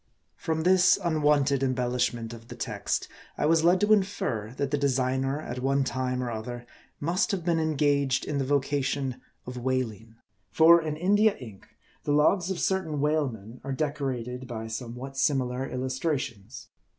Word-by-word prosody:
From 160 Hz, 0 st, -2 dB
this 185 Hz, 0 st, +5 dB
unwonted 150 Hz, -4 st, +2 dB
embellishment 125 Hz, -3 st, -1 dB
of 115 Hz, 0 st, -12 dB
the -, -, -9 dB
text, -, -, -2 dB, 0.3 s
I -, -, 0 dB
was 160 Hz, +1 st, +3 dB
led 175 Hz, +2 st, +5 dB
to 210 Hz, +1 st, +5 dB
infer, 190 Hz, -, -1 dB
that 140 Hz, -1 st, -1 dB
the 145 Hz, -, +2 dB
designer, 135 Hz, 0 st, 0 dB
at 125 Hz, -4 st, -6 dB
one 135 Hz, +2 st, +1 dB
time 130 Hz, -1 st, -2 dB
or 120 Hz, -, -3 dB
other, 120 Hz, +2 st, -6 dB, 0.3 s
must 175 Hz, +8 st, 0 dB
have 190 Hz, -6 st, -2 dB
been 170 Hz, -2 st, +2 dB
engaged 145 Hz, -4 st, +1 dB
in 145 Hz, -, -2 dB
the -, -, +1 dB
vocation 135 Hz, -1 st, -1 dB, 0.2 s
of 125 Hz, 0 st, -7 dB
whaling. 115 Hz, -3 st, -2 dB, 0.3 s
For, 165 Hz, +1 st, +6 dB
in 155 Hz, -1 st, -3 dB
India 205 Hz, +5 st, +3 dB
ink, 110 Hz, -7 st, -12 dB, 0.4 s
the 145 Hz, -, 0 dB
logs 175 Hz, +5 st, +3 dB
of 190 Hz, -2 st, -2 dB
certain 175 Hz, -6 st, 0 dB
whalemen 130 Hz, -7 st, -1 dB
are 135 Hz, 0 st, -3 dB
decorated 130 Hz, -4 st, -3 dB
by 115 Hz, -2 st, -5 dB
somewhat 125 Hz, +4 st, -6 dB
similar 135 Hz, -2 st, 0 dB
illustrations. 130 Hz, -4 st, -3 dB
135 Hz, 155 wpm, -27 LUFS, 125-155 Hz, 0.4 s, For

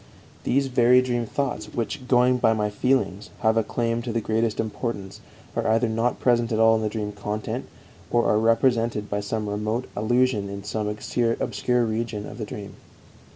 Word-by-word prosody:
These 140 Hz, +2 st, +2 dB
very 125 Hz, -1 st, +5 dB
dream 120 Hz, -2 st, -1 dB
thoughts 130 Hz, -4 st, -2 dB
which, 125 Hz, +3 st, -3 dB
going 125 Hz, 0 st, +4 dB
by 115 Hz, -2 st, +4 dB
my 105 Hz, -1 st, -1 dB
feelings, 105 Hz, -3 st, 0 dB
have 110 Hz, 0 st, +3 dB
a 115 Hz, -, +3 dB
claim 115 Hz, +1 st, -1 dB
to 120 Hz, -, -4 dB
the 115 Hz, -, 0 dB
greatest 110 Hz, 0 st, 0 dB
importance 110 Hz, -3 st, -4 dB, 0.3 s
are -, -, 0 dB
either 115 Hz, +2 st, +3 dB
not 115 Hz, +2 st, 0 dB
present 120 Hz, -1 st, +2 dB
at 110 Hz, -, +1 dB
all 115 Hz, 0 st, +5 dB
in 110 Hz, -, 0 dB
the 110 Hz, -, 0 dB
dream 105 Hz, -1 st, -3 dB
content, 105 Hz, +1 st, -4 dB, 0.4 s
or 120 Hz, -1 st, +2 dB
are 105 Hz, -, +3 dB
represented 115 Hz, -1 st, +2 dB
by 105 Hz, -, 0 dB
some 105 Hz, +1 st, -3 dB
remote 105 Hz, +4 st, -2 dB
allusion 110 Hz, -1 st, +1 dB
in 100 Hz, 0 st, -6 dB
some 105 Hz, +1 st, -2 dB
obscure 120 Hz, +3 st, 0 dB
region 110 Hz, -1 st, -3 dB
of 105 Hz, -, -9 dB
the 110 Hz, -, -3 dB
dream. 105 Hz, -1 st, -8 dB
115 Hz, 180 wpm, -25 LUFS, 105-120 Hz, 0.4 s, very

